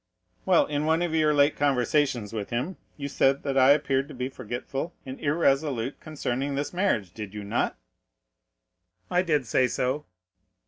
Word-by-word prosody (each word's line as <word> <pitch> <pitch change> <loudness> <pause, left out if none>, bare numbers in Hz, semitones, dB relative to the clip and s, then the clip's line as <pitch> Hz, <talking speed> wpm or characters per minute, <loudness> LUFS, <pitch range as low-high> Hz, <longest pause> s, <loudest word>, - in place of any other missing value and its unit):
"Well, 185 -3 +5
in 150 0 -2
one 160 +2 +2
of 170 -2 -2
your 155 -1 +3
late 145 0 +4
conversations 130 -4 +1
with 105 -3 -4
him, 130 +11 -2 0.2
you 140 -1 -4
said 140 0 +2
that 140 -2 -2
I 130 0 +6
appeared 140 -2 +3
to 150 - -10
be 125 +1 -3
forgetful 135 +7 -5
and 130 0 -7
irresolute 140 -4 +1
concerning 140 -3 -3
this 145 +4 -3
marriage, 120 - 0
did 105 -2 -7
you 105 - -5
not?" 100 - -1 1.3
"I 180 - +4
did 150 -7 +1
say 125 +3 +2
so." 130 +4 -2
140 Hz, 165 wpm, -27 LUFS, 125-150 Hz, 1.3 s, I